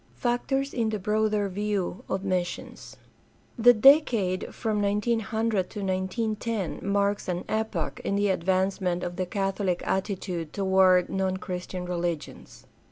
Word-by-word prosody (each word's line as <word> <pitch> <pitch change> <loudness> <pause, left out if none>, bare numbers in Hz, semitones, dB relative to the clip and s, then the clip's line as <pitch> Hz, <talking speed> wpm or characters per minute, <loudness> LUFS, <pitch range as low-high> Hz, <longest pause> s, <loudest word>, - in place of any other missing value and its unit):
Factors 270 +3 -1
in 230 -3 0
the 215 - -1
broader 210 +1 +1
view 200 -1 -2
of 190 0 -2
missions. 180 -2 -3 0.3
— - - -26
The 245 - +11
decade 220 -7 +4
from 215 -3 -1
1900 215 -1 0
to 210 - -7
1 - - -2 0.2
9 220 +1 -1
10 220 -6 -3
marks 200 +1 0
an 180 -1 -2
epoch 220 0 -2
in 200 - -1
the 205 0 +2
advancement 185 0 0
of 175 0 -4
the 185 -1 -1
catholic 195 -1 -1
attitude 185 -4 -2
toward 190 -2 +4
non 190 -1 -1
Christian 180 -1 -5
religions. 175 -4 -4
195 Hz, 140 wpm, -27 LUFS, 185-215 Hz, 0.3 s, The